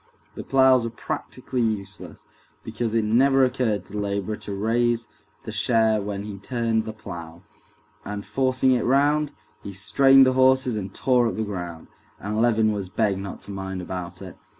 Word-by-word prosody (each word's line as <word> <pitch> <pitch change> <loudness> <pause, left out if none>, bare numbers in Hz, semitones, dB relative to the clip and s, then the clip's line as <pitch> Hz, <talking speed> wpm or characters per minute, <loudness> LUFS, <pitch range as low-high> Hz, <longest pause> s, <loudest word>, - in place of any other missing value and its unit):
The - - -7
ploughs 130 -2 +4
were 115 - -2
practically 120 +2 -4
useless, 105 -4 -4 0.4
because 115 0 -3
it 110 -2 +2
never 135 +4 +4
occurred 125 -5 -1
to - - -16
the 105 - -3
laborer 100 +1 -2
to 105 -1 -8
raise 115 +2 0 0.4
the - - -6
share 110 -3 +2
when 100 0 -4
he 105 -2 -7
turned 115 0 -1
the 110 - -4
plough, 85 -5 -9 0.6
and 105 -1 -6
forcing 130 0 +1
it 125 -3 +2
round, 145 +3 +2 0.3
he 100 - -8
strained 135 +8 +5
the 130 - +3
horses 130 -2 +3
and 100 -2 -4
tore 125 +2 +2
up - - -3
the 110 - -1
ground, 90 -5 -6 0.3
and 105 +2 -2
Levin 110 -2 +3
was 100 -3 -4
begged 100 -1 0
not 100 -1 -7
to 100 - -9
mind 95 -1 -5
about 90 0 -6
it. 95 - -9
110 Hz, 175 wpm, -24 LUFS, 100-125 Hz, 0.6 s, strained